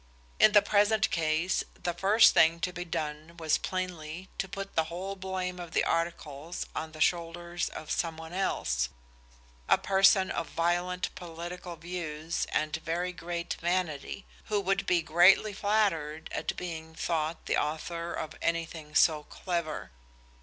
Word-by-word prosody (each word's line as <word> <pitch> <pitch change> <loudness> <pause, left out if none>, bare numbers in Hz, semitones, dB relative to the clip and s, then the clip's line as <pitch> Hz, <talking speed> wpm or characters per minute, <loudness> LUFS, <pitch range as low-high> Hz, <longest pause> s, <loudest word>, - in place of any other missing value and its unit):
In 215 - +7
the 205 -1 +7
present 205 +1 +3
case 160 +2 +1
the 175 - -3
first 200 +6 +6
thing 165 +1 +5
to 180 +1 -1
be 175 0 -4
done 155 0 -4
was 160 -2 +1
plainly 180 -1 -4
to 190 - -2
put 195 0 -6
the 160 - +3
whole 185 +4 -5
blame 185 -1 -3
of 170 -2 -8
the - - +3
articles 165 -1 -2
on 160 0 -4
the 155 - -10
shoulders 170 +1 0
of 155 - -7
some 165 -2 -1
one 160 +1 -9
else, - - 0 0.8
a - - +7
person 195 0 +4
of 165 - -3
violent 175 +2 0
political 175 +1 -7
views 165 -1 -4
and 155 0 0
very 170 +3 -2
great 170 0 -4
vanity, 175 -1 -1 0.2
who 210 -1 +1
would 195 0 0
be 175 -2 +3
greatly 180 +6 +5
flattered 195 -7 0
at - - -2
being 160 -2 -6
thought 160 -1 -2
the - - +1
author 165 +3 -2
of 160 -1 -4
anything 165 -2 -2
so 155 -2 +5
clever. 170 - -3
170 Hz, 150 wpm, -30 LUFS, 160-185 Hz, 0.8 s, In